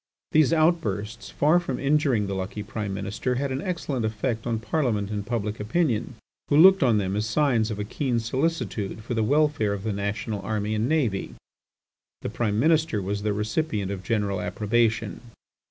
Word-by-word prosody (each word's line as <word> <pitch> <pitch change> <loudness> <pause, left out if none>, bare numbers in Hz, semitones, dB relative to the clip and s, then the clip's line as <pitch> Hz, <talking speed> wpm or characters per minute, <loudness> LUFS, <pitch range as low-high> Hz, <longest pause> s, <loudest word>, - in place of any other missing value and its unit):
These 155 -2 +4
outbursts, 115 - 0
far 155 +4 +3
from 135 -8 -4
injuring 140 -6 +2
the 100 - -3
lucky 95 +2 -4
Prime 105 -1 -4
Minister, 100 +6 -2
had 140 +2 -1
an 130 +2 -2
excellent 155 - -2
effect 110 +2 -2
on 115 -1 0
Parliament 110 -5 -1
and 105 -1 -2
public 105 -1 -3
opinion, 120 0 0 0.3
who 145 - +3
looked 190 +4 +8
on 120 -5 +4
them 95 -1 -1
as 105 +1 -1
signs 120 -3 +2
of 105 - -4
a 105 - -2
keen 125 +2 -1
solicitude 115 -5 -2
for 120 - -4
the 115 - +1
welfare 145 -4 +2
of 100 -1 -5
the 110 -1 -1
national 100 +1 -3
army 105 +1 -2
and 110 +4 0
navy. 125 -12 0 0.9
The - - -2
Prime 110 -2 -1
Minister 155 -4 +3
was 100 +1 -3
the 105 0 0
recipient 105 0 -1
of 95 -2 -4
general 100 -1 -1
approbation. 110 +3 0
110 Hz, 175 wpm, -25 LUFS, 105-135 Hz, 0.9 s, looked